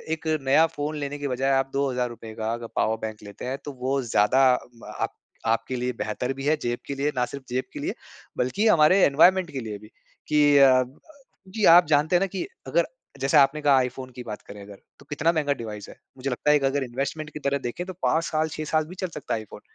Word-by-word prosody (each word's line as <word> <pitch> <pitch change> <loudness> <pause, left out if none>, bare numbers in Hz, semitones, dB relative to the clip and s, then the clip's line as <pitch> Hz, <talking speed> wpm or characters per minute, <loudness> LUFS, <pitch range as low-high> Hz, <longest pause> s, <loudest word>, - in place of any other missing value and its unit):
एक 160 0 -10
नया 140 +5 +4
फ़ोन 150 -1 -4
लेने 145 0 -4
की 145 - -3
बजाए 135 +1 0
आप 135 - -2
₹2000 125 -5 -2
का 110 0 -2
अगर 115 0 -6
पावर 110 +1 +1
बैंक 110 -1 -4
लेते 100 +4 -9
हैं 130 +2 -3
तो 145 - -5
वो 135 +2 0
ज्यादा 120 +4 +3
अ, 120 -2 -6
प - - -8 0.4
आपके 115 +3 0
लिए 125 +1 -1
बेहतर 115 +4 -2
भी 135 +1 -6
है 155 - +3
जेब 120 0 -2
के 140 - -3
लिए 145 +2 0
ना 125 -1 +1
सिर्फ़ 140 +2 -9
जेब 130 +1 -1
के - - -6
लिए - - -2 0.4
बल्कि 165 - +1
हमारे 170 -1 +5
एनवायरनमेंट 175 +4 +4
के 135 - -4
लिए 110 -3 -6
भी 105 - -14 0.4
कि 145 -1 +4
अ 130 -2 +6 0.7
जी 215 -3 +2
आप 175 -1 +7
जानते 150 +3 +3
हैं 175 - +4
ना 195 - +2
कि 185 - -2 0.2
अगर 170 +6 +2 0.4
जैसे 140 +3 +3
आपने 145 +2 +4
कहा 140 -2 +5
iPhone 130 +1 -6
की 125 - -7
बात 105 -3 -7
करें 100 0 -10
अगर 100 0 -12 0.2
तो 140 - -17
कितना 150 +3 +1
महँगा 150 -3 +1
डिवाइस 105 -2 -7
है। - - -12 0.2
मुझे 130 +1 -3
लगता 135 +3 -1
है - - +6
एक 140 - -4
अगर 140 -1 -1
इन्वेस्टमेंट 140 +5 -4
की - - -6
तरह 140 -1 0
देखे 175 +9 -6
तो 185 - -7
5 165 +1 +2
साल 155 0 0
6 155 - -4
साल 155 -1 +3
भी 180 - -10
चल 185 - -1
सकता 150 - -3
है 110 -1 -5
iPhone। - - -12
135 Hz, 240 wpm, -25 LUFS, 125-150 Hz, 0.7 s, आप